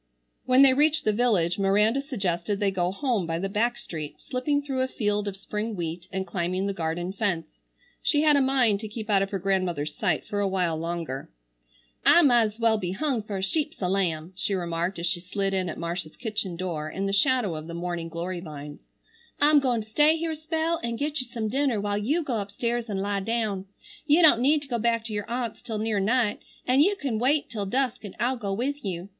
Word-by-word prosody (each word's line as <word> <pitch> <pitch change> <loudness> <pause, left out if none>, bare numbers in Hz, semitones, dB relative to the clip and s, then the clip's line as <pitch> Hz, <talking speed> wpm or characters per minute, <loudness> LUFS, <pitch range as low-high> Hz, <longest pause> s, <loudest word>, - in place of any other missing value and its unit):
When 255 +2 +7
they 270 -1 +7
reached 300 +3 +3
the 215 - +3
village 205 -7 +2
Miranda 210 +6 +3
suggested 195 - -2
they 200 -2 +2
go 180 -1 0
home 225 - -1
by 165 0 -1
the 190 +3 -2
back 235 +4 +1
street, 155 -10 -7
slipping 285 +3 -1
through 270 -2 -2
a 260 - +1
field 210 -4 -1
of 195 -1 -4
spring 210 +2 -4
wheat 170 0 -4
and 190 -1 -2
climbing 185 0 -1
the 200 - -1
garden 175 +1 -2
fence. 180 -6 -2 0.4
She 295 -1 +2
had 300 -1 +5
a 280 - +4
mind 255 -6 +3
to 215 - -5
keep 215 0 -5
out 195 -1 +4
of 195 - 0
her 200 - -2
grandmother's 180 -6 -1
sight - - 0
for 205 - -3
a 200 - +2
while 180 -4 0
longer. 165 -4 -4 0.7
"I 345 - +7
might's 235 -5 +3
well 225 -2 +3
be 180 -2 -3
hung 260 +2 0
for 205 -1 -5
a 190 - -3
sheep's 300 +9 -1
a 185 - 0
lamb," 180 -3 -1
she 195 +1 -1
remarked, 175 +1 -2
as 170 - -3
she 175 0 0
slid 195 +2 -2
in 185 -2 0
at - - -6
Marcia's 170 -1 -4
kitchen 215 -6 -3
door 170 -4 -3
in 195 +5 -3
the 195 - -1
shadow 240 - +2
of 155 +1 -7
the 170 - -6
morning 170 -1 -3
glory 175 +2 -4
vines. 150 -3 -9 0.5
"I'm 295 +1 +6
goin' 245 -5 0
to - - -20
stay 300 +8 +4
here 330 0 -2
a - - -3
spell 320 +1 -1
an' 235 0 -2
get 290 +3 -2
you 255 - -8
some 225 -2 -2
dinner 265 -1 +1
while 205 0 -1
you 295 +11 0
go 245 -6 -1
upstairs 230 +4 -2
an' 200 - -2
lie 200 +1 -1
down. 210 -2 -1 0.4
You 315 +4 +5
don't 300 -7 +7
need 290 +3 +3
to - - -11
go 240 -3 -1
back 230 0 +1
to 220 - -5
your 205 -1 -3
aunt's 235 -2 -3
till 220 -2 -4
near 215 -1 0
night, 215 +1 +1 0.3
an' 255 +2 +3
you 390 +8 +5
can 270 - -2
wait 280 +4 +1
till 205 -4 -3
dusk 255 +2 -1
an' 205 - -8
I'll 245 +4 +1
go 205 -4 -3
with 265 +8 -2
you. 185 -1 -4
210 Hz, 230 wpm, -26 LUFS, 185-255 Hz, 0.7 s, When